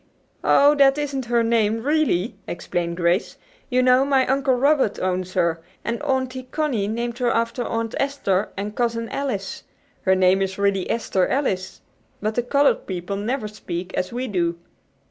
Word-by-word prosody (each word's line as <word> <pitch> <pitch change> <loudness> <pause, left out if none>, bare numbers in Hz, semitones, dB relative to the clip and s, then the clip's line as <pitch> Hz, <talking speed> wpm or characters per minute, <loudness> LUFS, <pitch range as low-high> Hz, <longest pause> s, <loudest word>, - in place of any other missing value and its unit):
"Oh, 285 +1 +6
that 275 0 +5
isn't 280 -3 -2
her 235 0 +2
name, 225 -1 +1
really," 275 - +1
explained 170 0 -3
Grace. 175 +2 +1 0.3
"You 255 -1 +2
know 255 +1 +5
my 270 -2 +3
Uncle 270 0 +2
Robert 270 -4 +2
owns 185 0 -2
her, 170 -2 +1 0.2
and 235 +2 -2
Auntie 260 -2 -2
Connie 270 -10 -1
named 235 +2 -3
her 245 -1 +2
after 230 +1 0
Aunt 230 -1 -2
Esther 215 -8 0
and 205 +2 -4
Cousin 230 -1 -1
Alice. 205 -9 -3 0.4
Her 190 - +3
name 185 +1 +4
is 190 0 -2
really 200 -2 0
Esther 195 -5 +1
Alice. 195 -10 -2 0.4
But 215 +1 -1
the 245 - +1
colored 280 +4 +2
people 185 +1 -4
never 215 +3 -2
speak 185 -3 -6
as 180 - -2
we 250 +2 -3
do." 170 -5 0
230 Hz, 165 wpm, -23 LUFS, 190-260 Hz, 0.4 s, Oh